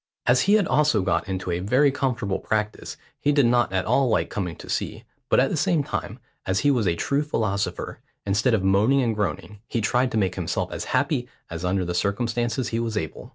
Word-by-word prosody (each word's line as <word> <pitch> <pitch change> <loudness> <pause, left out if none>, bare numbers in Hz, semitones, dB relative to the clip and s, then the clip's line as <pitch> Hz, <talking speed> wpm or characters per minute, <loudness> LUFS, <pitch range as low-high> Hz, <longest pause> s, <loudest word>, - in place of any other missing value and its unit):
As 125 +1 +4
he 200 - +3
had 210 -3 +3
also 145 -12 +2
got 85 0 0
into 95 -1 -3
a 85 - -1
very 125 +9 +3
comfortable 120 -8 -1
practice, 105 -1 -3 0.2
he 145 - +2
did 145 -3 +4
not 120 -3 +3
at 95 -1 0
all 135 -2 +2
like - - 0
coming 90 -5 -3
to - - -12
sea, - - -3 0.3
but - - +4
at - - +2
the - - 0
same 160 -4 +1
time, 115 -5 -4 0.3
as 95 0 +1
he 145 - +4
was 120 -7 +1
a 85 - +2
true 140 +11 0
philosopher, 110 -9 -2 0.3
instead 110 +5 +2
of 100 - -1
moaning 105 +8 +3
and 115 -2 0
groaning, 105 +1 -3
he 115 - -2
tried 125 +4 +1
to - - +1
make 95 -4 +1
himself - - -2
as - - -4
happy - - 0 0.2
as 85 +1 -5
under 90 0 0
the 90 - -3
circumstances 120 +6 -1
he 115 - -1
was 115 -2 -2
able. 80 -7 -5
110 Hz, 220 wpm, -24 LUFS, 95-130 Hz, 0.3 s, As